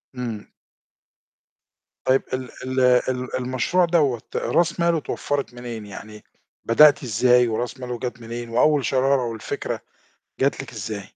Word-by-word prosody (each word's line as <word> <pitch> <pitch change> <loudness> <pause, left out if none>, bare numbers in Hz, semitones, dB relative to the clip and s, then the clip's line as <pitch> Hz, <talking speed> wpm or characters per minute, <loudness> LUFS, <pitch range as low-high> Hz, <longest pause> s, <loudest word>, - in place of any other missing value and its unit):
إمم. 115 -4 -5 1.6
طيب 130 +1 +4
ال 130 -1 -3
ال 130 0 -2 0.3
ال 125 -1 -3
المشروع 130 +8 +1
دوّة 145 -9 +2
راس 170 0 +1
ماله 170 -1 +3
اتوفرت 145 -3 -3
منين، 120 -3 -7
يعني 105 +1 -10 0.4
بدأتِ 145 +5 +6
إزاي 125 +1 +4
وراس 120 +3 -3
ماله 125 -2 -5
جات 125 -1 -5
منين 115 +1 -6
وأول 140 +3 +3
شرارة 135 +1 +2
والفكرة 115 -2 -4 0.6
جات 135 0 +1
لِك 135 - -11
إزاي؟ 105 -2 -6
125 Hz, 130 wpm, -23 LUFS, 115-135 Hz, 1.6 s, بدأتِ